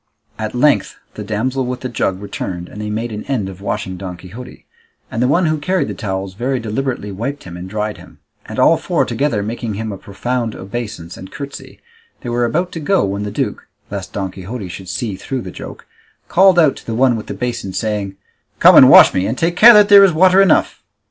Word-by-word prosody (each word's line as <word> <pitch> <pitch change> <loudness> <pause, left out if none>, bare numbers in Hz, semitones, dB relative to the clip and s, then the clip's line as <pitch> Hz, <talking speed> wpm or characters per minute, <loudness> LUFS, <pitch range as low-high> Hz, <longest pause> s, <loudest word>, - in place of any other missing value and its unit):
At - - -4
length - - +2 0.2
the 105 - -7
damsel 120 +6 -2
with 125 0 -4
the 130 - -3
jug 95 -6 -2
returned 90 -3 -6
and 105 - -9
they 105 - -4
made 110 +2 -3
an 105 0 -6
end 115 -9 -2
of 95 0 -11
washing 100 -2 -4
Don 90 -1 -7
Quixote, 100 +8 -12 0.5
and 115 - -3
the 125 - +3
one 170 +6 +2
who 155 -1 0
carried 185 +5 -1
the - - -4
towels 95 -2 -4
very 125 +6 -2
deliberately 115 -1 -3
wiped 120 +9 -5
him 90 -2 -9
and 90 +1 -8
dried 105 +1 -3
him; - - -16 0.3
and - - -7
all - - +4
four - - 0
together 140 -8 -1
making 115 0 -4
him 110 +1 -4
a 100 - -7
profound 115 +3 -3
obeisance 100 -4 -7
and 95 - -11
curtsey, 140 -1 -9 0.4
they 120 - -6
were 120 0 0
about 175 +10 -1
to 165 - -6
go, 190 - +1
when 100 +1 -3
the 105 - -3
duke, 105 - -4 0.2
lest 100 -2 -6
Don 95 -2 -3
Quixote 95 +2 -7
should 90 +1 -9
see 110 -2 -3
through 130 +6 -5
the - - -8
joke, - - -10 0.4
called 190 0 +4
out 155 -5 +4
to - - -13
the 115 - -3
one 125 0 +3
with 110 - -6
the - - -5
basin 120 -5 -4
saying, 105 -1 -3 0.4
"Come - - +7
and - - +9
wash - - +8
me, 95 +1 0
and 120 - -3
take 170 +1 0
care 230 +5 +9
that 210 -1 +7
there 200 -1 +9
is 190 -3 +4
water 185 +4 +5
enough." 195 -5 +2
110 Hz, 225 wpm, -17 LUFS, 100-135 Hz, 0.5 s, and